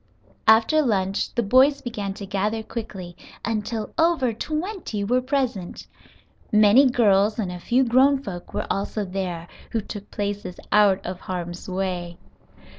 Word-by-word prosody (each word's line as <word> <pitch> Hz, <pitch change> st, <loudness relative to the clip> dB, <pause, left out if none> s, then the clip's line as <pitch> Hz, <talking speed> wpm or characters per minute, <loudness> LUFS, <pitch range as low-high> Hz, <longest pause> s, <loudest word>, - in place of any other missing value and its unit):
After 225 Hz, +8 st, +5 dB
lunch 195 Hz, -7 st, 0 dB
the 235 Hz, -, +1 dB
boys 260 Hz, +6 st, +4 dB
began 205 Hz, -6 st, -4 dB
to 200 Hz, -, -7 dB
gather 210 Hz, +3 st, -1 dB
quickly, 195 Hz, -6 st, -7 dB, 0.3 s
until 220 Hz, 0 st, -3 dB
over 320 Hz, -8 st, +3 dB
twenty 310 Hz, -, -4 dB
were 250 Hz, +5 st, +2 dB
present. 255 Hz, -9 st, -2 dB, 0.7 s
Many 215 Hz, +6 st, +6 dB
girls 210 Hz, -3 st, +3 dB
and 200 Hz, -6 st, -2 dB
a 180 Hz, -, -7 dB
few 245 Hz, +8 st, +2 dB
grown 265 Hz, +3 st, +4 dB
folks 175 Hz, -6 st, -7 dB
were -, -, -3 dB
also 200 Hz, +1 st, -2 dB
there, 180 Hz, -3 st, -4 dB, 0.3 s
who 230 Hz, -, +1 dB
took 205 Hz, 0 st, -9 dB
places 200 Hz, -3 st, -4 dB
out 205 Hz, -2 st, +4 dB
of 180 Hz, 0 st, -5 dB
harm's 175 Hz, -1 st, -6 dB
way. 180 Hz, -2 st, -3 dB
210 Hz, 140 wpm, -24 LUFS, 190-245 Hz, 0.7 s, Many